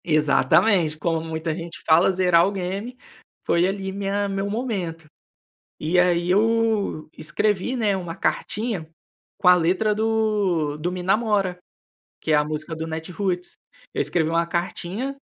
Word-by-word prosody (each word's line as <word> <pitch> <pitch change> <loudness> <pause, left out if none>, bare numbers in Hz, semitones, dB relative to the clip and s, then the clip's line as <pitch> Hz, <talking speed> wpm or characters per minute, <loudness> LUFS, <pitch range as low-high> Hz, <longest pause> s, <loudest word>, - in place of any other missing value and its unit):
Exatamente, 155 +3 +3
como 165 0 -1
muita 160 0 -3
gente 170 0 -7
fala 165 +4 +5
zerar 180 -2 +4
o - - -1
game, 200 +6 -4 0.5
foi 170 +1 +3
ali 195 0 -3
minha 200 +1 -1
meu 195 0 -2
momento, 195 -8 -3 0.7
e 165 +4 0
aí 175 -1 +3
eu 220 -4 +1
escrevi, 210 +8 -1
né, 215 -4 +1
uma 175 -3 -5
cartinha 210 -5 -2 0.5
com 180 - +3
a 180 - +9
letra 180 +5 +2
do 210 -8 0
do 170 +4 -2
me 180 0 -5
namora, 195 -2 +1 0.6
que 160 - -2
é - - +6
a 150 - +4
música 155 +2 -4
do 160 0 -4
Natiruts, 175 +3 -3 0.4
eu - - -3
escrevi 160 -3 0
uma 165 +1 +1
cartinha, 185 +9 -3
180 Hz, 145 wpm, -23 LUFS, 165-205 Hz, 0.7 s, a